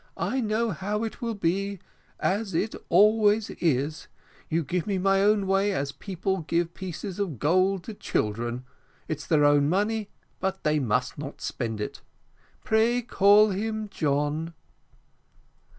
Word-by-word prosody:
I 265 - -1
know 220 +1 0
how 205 +5 -2
it 225 - -5
will 230 -2 -2
be, 195 +2 -1 0.4
as 195 -1 -1
it 210 +6 0 0.2
always 210 +3 +4
is: 150 -1 -1 0.4
you 165 +1 +1
give 175 +6 -2
me 200 -2 0
my 195 +1 +3
own 205 0 +3
way 195 +1 +2
as 140 -5 -2
people 190 +3 -3
give 170 +2 -1
pieces 190 +2 -6
of 180 -10 -2
gold 185 - +2
to 220 - -7
children, 120 - -2 0.4
it's 155 - -4
their 150 -3 +4
own 145 0 +4
money, 210 +3 0 0.3
but 190 0 -2
they 150 0 +2
must 125 +1 -1
not 145 -1 -7
spend 115 -4 -4
it. 105 - -5 0.6
Pray 230 +3 +2
call 210 -1 +5
him 215 +2 -3
John." 150 +1 -1
190 Hz, 145 wpm, -26 LUFS, 150-210 Hz, 0.6 s, call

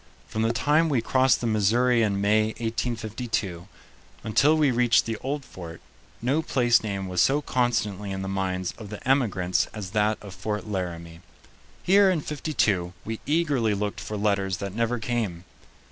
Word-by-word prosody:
From 110 +10 -3
the 115 +1 +2
time 150 +8 +2
we 135 -5 +2
crossed 130 +3 +2
the - - -2
Missouri 115 +3 +3
in 100 -3 +1
May, 110 +2 +2
1852, 115 -5 -3 0.6
until 140 +8 +3
we 150 -4 +3
reached 120 -1 +3
the 115 - -2
old 140 +3 -4
fort, 85 -2 -9 0.4
no 135 +6 +2
place 120 -6 +3
name 100 -3 -3
was 90 -1 +1
so 140 +2 +3
constantly 115 -7 -1
in 95 0 -4
the - - -4
minds 95 -1 -2
of 105 -3 -9
the 105 +3 -8
emigrants 100 -10 +1
as 100 -3 -6
that 105 0 +1
of 100 -3 -10
Fort 105 +1 -4
Laramie. 85 -4 -5 0.6
Here, 195 +1 +5
in 175 -5 +1
'52, 110 - -1
we 110 0 -4
eagerly 145 -9 +1
looked 105 0 -3
for 105 - -5
letters 100 -3 0
that 100 -1 -5
never 115 +2 0
came. 110 -7 -2
110 Hz, 165 wpm, -25 LUFS, 100-125 Hz, 0.6 s, Here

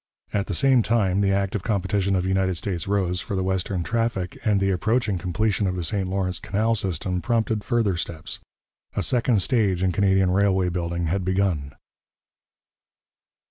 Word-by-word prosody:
At 100 -1 0
the 95 - -2
same 135 +1 +4
time, 100 -4 +1
the 100 -1 +2
active 100 0 0
competition 100 -1 0
of 90 -1 0
United 95 -1 +1
States 90 -2 -3
roads 95 -3 0
for 100 - -4
the 95 - 0
western 95 -1 -1
traffic 110 -2 -1
and 105 -2 +2
the 95 0 +1
approaching 105 +1 0
completion 100 +3 0
of 90 - -1
the 90 - -3
St 95 +3 -1
Lawrence 95 -1 -2
canal 110 +3 0
system 90 -3 -1
prompted 110 +1 0
further 115 -6 +1
steps. 80 -1 -5 0.6
A - - 0
second 120 -5 +2
stage 100 -8 +1
in 95 - +2
Canadian 95 -1 +2
railway 95 -1 +2
building 85 -1 -2
had 95 +4 -1
begun. 90 -7 0
95 Hz, 165 wpm, -24 LUFS, 90-105 Hz, 0.6 s, same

